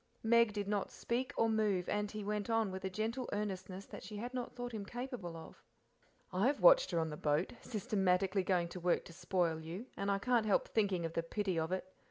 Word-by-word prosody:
Meg 235 0 +5
did 205 -1 -3
not 205 -1 0
speak 250 +2 -2
or 230 - +4
move, 210 -5 +1
and 210 0 0
he 215 0 -5
went 210 +1 -2
on 225 -3 +2
with 190 0 -6
a 190 - -1
gentle 225 +6 -2
earnestness 195 -2 -3
that - - -9
she 210 - -7
had 240 +4 -5
not 250 -1 -3
thought 245 0 -4
him 215 -3 -4
capable 240 -6 -5
of.. 160 - -11 0.7
"I 190 +6 +3
have 280 +1 +1
watched - - +7
her 175 - -1
on 160 -1 -1
the 150 - -5
boat, 150 +5 +1
systematically 195 -4 +1
going 180 -2 +1
to 180 - -7
work 175 0 +1
to 170 - -11
spoil 175 -2 0
you, 170 +8 -6
and 200 0 -2
can't 235 0 +2
help 205 - +3
thinking 195 -6 +1
of 165 - -4
the 165 - +1
pity 185 +1 -1
of 160 +2 -1
it. 185 0 -1
200 Hz, 225 wpm, -35 LUFS, 180-225 Hz, 0.7 s, watched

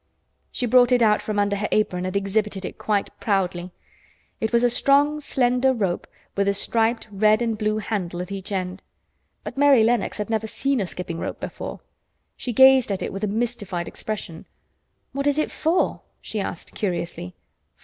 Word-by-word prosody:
She 250 - 0
brought 245 +1 +5
it 245 -1 +4
out 210 -1 +4
from 210 -1 -3
under 205 0 +2
her 210 +1 -1
apron 185 -4 +1
and 185 +2 -1
exhibited 200 -1 -1
it - - -7
quite 205 -2 0
proudly. 185 -3 -1 0.7
It 220 - -1
was 235 0 +3
a 245 - +5
strong, 285 +4 +3
slender 255 -1 +2
rope 195 -7 -2 0.3
with 200 0 +1
a 200 - +2
striped 225 +2 +1
red 215 +2 +3
and 230 -2 0
blue 215 0 0
handle 190 -5 -3
at 180 +2 -5
each 195 0 -6
end, 185 -1 -3 0.6
but - - -6
Mary 280 -5 +6
Lennox 235 -1 +1
had 210 -1 -3
never 220 0 0
seen 275 +2 0
a 190 - -2
skipping 175 -2 -6
rope - - -4
before. - - -6 0.5
She 245 - -4
gazed 265 -1 +6
at 195 - -2
it - - -4
with 195 +2 -5
a - - +2
mystified 205 -5 -2
expression. 185 -6 -6 0.6
"What 275 +1 -2
is 285 0 +2
it 310 - 0
for?" 330 +3 0 0.2
she 220 - -5
asked 190 -3 -5
curiously. 170 - -3
215 Hz, 180 wpm, -23 LUFS, 195-245 Hz, 0.7 s, Mary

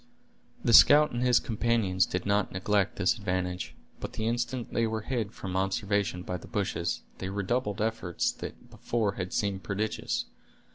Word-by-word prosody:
The 120 - +3
scout 150 +5 +8
and 120 - -2
his 125 -1 +5
companions 110 -5 +1
did 90 0 -3
not 100 0 +1
neglect 100 +1 +1
this 95 -2 +2
advantage, 90 -3 -3 0.2
but - - -6
the 110 - -3
instant 120 +1 -2
they 115 -1 +2
were 110 0 -2
hid 115 -4 -2
from 95 -4 -6
observation 95 -1 0
by 90 - -3
the - - -12
bushes, 95 -6 -2 0.2
they 95 - -4
redoubled 105 +2 -1
efforts 110 -6 -1
that - - -9
before 110 -4 -1
had 95 -2 -5
seemed 100 -2 -1
prodigious. 100 +4 -2
100 Hz, 160 wpm, -29 LUFS, 95-115 Hz, 0.2 s, scout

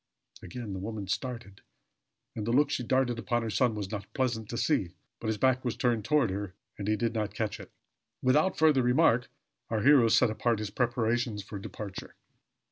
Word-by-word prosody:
Again 105 +3 -7
the 95 - -4
woman 105 +1 -5
started; 115 -1 -4 0.7
and 110 -1 -4
the - - +1
look 145 +4 +3
she - - -1
darted 125 -1 +1
upon 120 +1 -1
her 110 - -3
son 115 +3 +2
was 100 -2 -5
not 105 -2 -6
pleasant 120 -5 -1
to 120 - -4
see; 100 - 0 0.2
but 115 - -5
his 110 -1 0
back 130 +2 +2
was 120 -3 -2
turned 120 -4 +1
toward 145 -7 +2
her, 100 -1 -5 0.2
and 100 - -4
he 110 - +2
did 115 +1 -1
not 110 -2 -2
catch 105 -1 -2
it. 95 - -10 0.5
Without 150 +9 +2
further 155 -4 +4
remark, 125 -1 +3 0.4
our 110 -2 0
hero 135 -4 +6
set 110 0 +4
about 115 +1 0
his 105 -1 -4
preparations 120 -2 0
for 100 0 -7
departure. 100 0 -8
115 Hz, 195 wpm, -29 LUFS, 105-125 Hz, 0.7 s, hero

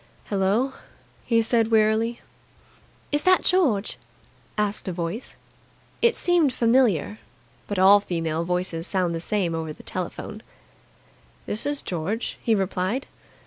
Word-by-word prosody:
"Hello?" 205 +7 +1 0.5
he 230 -1 +3
said 225 -1 +2
wearily. 225 +1 +2 0.9
"Is 290 0 +1
that 370 +2 +4
George?" 275 - +1 0.6
asked 210 -1 0
a - - -1
voice. 175 +7 -4 0.7
It 470 0 +4
seemed 345 -6 +3
familiar, 230 - +2 0.5
but 205 - -3
all 195 +2 +7
female 165 -4 -2
voices 180 -1 -2
sound 185 -3 0
the 165 - -2
same 180 -1 -1
over 160 -1 -3
the - - -15
telephone. 185 +3 -5 1.0
"This 215 +6 0
is 290 -1 -1
George," 185 +7 -3
he 225 - +2
replied. 195 +5 -1
210 Hz, 125 wpm, -24 LUFS, 180-235 Hz, 1.0 s, all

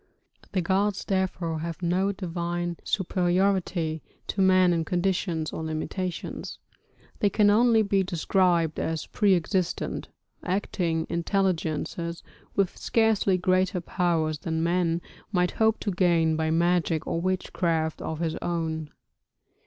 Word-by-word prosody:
The 185 - +2
gods, 195 +3 0
therefore, 180 -4 -1
have 165 +1 -5
no 185 +3 +2
divine 175 -2 -3
superiority 180 -3 0 0.3
to 195 - 0
man 185 -1 +5
in 165 -1 0
conditions 175 -3 -1
or 160 - -4
limitations; 165 +3 -4 0.6
they 205 - +3
can 205 +1 +4
only 225 0 +5
be 200 -1 +2
described 175 -2 +1
as 160 -1 -2
pre 200 -3 +3
existent, 180 +1 -1 0.3
acting 180 -3 -1
intelligences, 170 -2 -1 0.3
with 195 -3 +1
scarcely 220 -4 +2
greater 185 0 +1
powers 165 -3 0
than 160 +1 -2
man 170 0 +1 0.3
might 180 -3 +2
hope 220 0 +2
to 205 - -1
gain 170 -3 +3
by 160 0 0
magic 170 -1 +1
or 165 - -1
witchcraft 170 -3 -1
of 160 0 -4
his 160 -1 -1
own. 160 -3 -2
175 Hz, 120 wpm, -26 LUFS, 165-190 Hz, 0.6 s, man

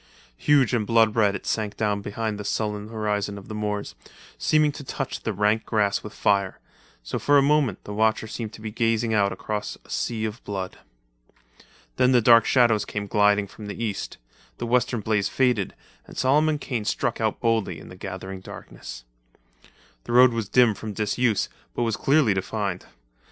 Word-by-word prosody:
Huge 140 -4 +3
and 110 -4 0
blood 115 -2 +4
red 105 -3 +3
it 100 - -7
sank 105 -2 -2
down 105 -2 0
behind 105 +1 -3
the - - -4
sullen 105 0 -2
horizon 105 -2 -2
of 100 - -11
the - - -5
moors, 105 -1 -3 0.4
seeming 150 - +2
to 145 - -9
touch 135 0 -4
the 110 - -2
rank 105 +2 +1
grass 105 -3 +1
with 105 - -8
fire; 100 -3 +1 0.5
so - - -3
for 145 0 +4
a 140 - +5
moment 145 -2 +2
the 105 - -7
watcher 110 +1 +1
seemed 110 0 -5
to - - -11
be 110 -1 -5
gazing 115 0 +1
out 100 -2 +3
across 105 -1 -4
a - - -14
sea 110 -2 -1
of 110 +2 -6
blood. 95 -2 -5 1.2
Then 125 +1 +4
the 125 - +6
dark 115 0 +6
shadows 120 -5 +4
came 105 -1 -4
gliding 105 0 +3
from 105 +1 -11
the 100 - -5
east, 105 -4 -4 0.4
the - - -4
western 120 -1 +1
blaze 105 -1 0
faded, 125 -7 +1 0.3
and - - -12
Solomon 150 +4 +3
Kane 125 -6 -4
struck 115 +2 -1
out, 110 -1 0
boldly 115 -3 0
in - - -12
the - - -10
gathering 95 0 -7
darkness. - - -10 1.0
The - - -4
road 125 0 +7
was 115 -3 -3
dim 120 -3 +5
from 105 +1 -7
disuse 110 +1 +1 0.3
but - - 0
was 115 -3 0
clearly 140 -6 +3
defined. 95 -1 -3
110 Hz, 185 wpm, -25 LUFS, 105-120 Hz, 1.2 s, road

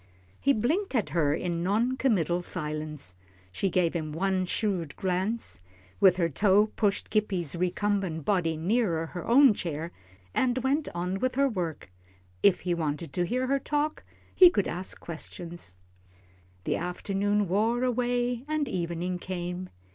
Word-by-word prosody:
He 280 - +3
blinked 290 - 0
at 215 -10 +1
her 150 -2 +2
in 170 0 -2
non 220 +8 +1
committal 180 - +1
silence. 150 - -4 0.4
She 195 - -1
gave 180 -2 +1
him 155 -3 -3
one 185 +3 0
shrewd 180 -8 -1
glance, 190 - -2 0.4
with 185 -2 +6
her 170 -2 +2
toe 205 +7 +3
pushed 205 -2 0
Gippie's 190 -7 0
recumbent 180 -2 -1
body 170 -6 +1
nearer 175 -2 +1
her 175 +2 -7
own 260 0 +7
chair, 165 -3 -4 0.4
and 255 -1 +1
went 285 +3 +1
on 180 +2 -2
with 255 +2 0
her 275 +1 +4
work. 170 - -4 0.5
If 190 - +4
he 180 - 0
wanted 155 -2 -3
to 175 +2 0
hear 255 +4 0
her 275 +2 +1
talk, 295 +2 -1 0.3
he 365 -2 +9
could 205 - 0
ask 180 +2 -4
questions. 170 - -7 0.9
The - - 0
afternoon 200 +3 0
wore 225 +7 +1
away 245 -1 0
and 305 -2 0
evening 175 0 -2
came. 180 0 -5
185 Hz, 145 wpm, -28 LUFS, 170-235 Hz, 0.9 s, he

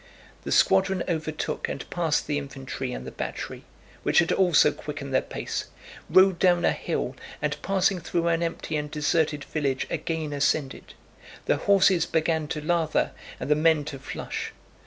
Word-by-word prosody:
The - - -3
squadron 190 -1 +3
overtook 155 -2 -2
and - - -5
passed 165 -4 +1
the 145 -1 0
infantry 135 -2 -5
and 65 - -6
the 65 - -6
battery—which - - -5
had 170 - +5
also 175 -5 +5
quickened 145 -2 -7
their - - +4
pace—rode 185 +1 0
down 175 -2 +4
a - - +4
hill, - - -3 0.2
and - - -1
passing 195 -1 +1
through 170 0 -1
an 165 0 +1
empty 165 -2 -2
and 150 0 -3
deserted 150 -1 0
village 140 -4 -1
again 160 -3 -2
ascended. 140 -1 -1 0.5
The - - +2
horses 190 -3 +4
began 160 -1 0
to 150 +1 -3
lather 165 -2 +1 0.3
and - - -4
the 150 - +5
men 155 -1 +3
to 135 - -7
flush. 135 - -5
160 Hz, 155 wpm, -26 LUFS, 145-175 Hz, 0.5 s, had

